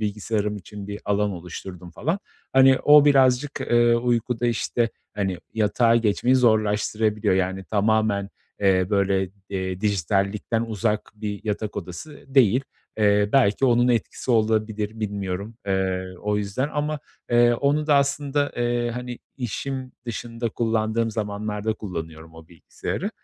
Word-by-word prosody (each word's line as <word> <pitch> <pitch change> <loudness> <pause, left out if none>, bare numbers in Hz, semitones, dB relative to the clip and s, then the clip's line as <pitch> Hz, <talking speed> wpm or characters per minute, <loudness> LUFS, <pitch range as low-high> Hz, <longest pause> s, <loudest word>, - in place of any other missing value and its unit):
bilgisayarım 105 0 -2
için 100 +1 -9
bir 105 0 -6
alan 105 0 +1
oluşturdum 90 0 -8
falan. 160 - -2 0.3
Hani, 130 0 +6
o 150 0 +8
birazcık, 135 0 +3
eee, 120 0 +3
uykuda 120 0 0
işte, 120 0 0 0.2
hani, 95 -3 -2 0.2
yatağa 115 +2 +3
geçmeyi 120 +3 +2
zorlaştırabiliyor. 110 -3 +2
Yani, 95 +1 -1
tamamen, 105 -1 +1 0.3
eee, 95 -2 +3
böyle, 95 -2 +1 0.2
eee, 95 -1 -3
dijitallikten 100 +3 0
uzak 110 -1 -2
bir 105 -1 -5
yatak 105 0 -3
odası 100 - -8
değil. 130 0 +4 0.3
Eee, 105 -1 +3
belki 135 -2 +3
onun 120 -1 +4
etkisi 120 +2 -1
olabilir, 110 -1 0
bilmiyorum, 100 0 -4
eee, 95 -1 -1
o 105 0 0
yüzden. 105 +7 -2
Ama, 150 0 -1 0.3
eee, 120 0 +5
onu 145 +4 +1
da 150 - +4
aslında, 140 0 +1
eee, 120 0 0
hani, 125 0 -6 0.2
işim 130 +2 -4
dışında 115 0 -4
kullandığım 115 0 0
zamanlarda 105 0 -2
kullanıyorum 80 -5 -7
o 80 0 -14
bilgisayarı. 85 - -5
110 Hz, 130 wpm, -24 LUFS, 100-120 Hz, 0.3 s, o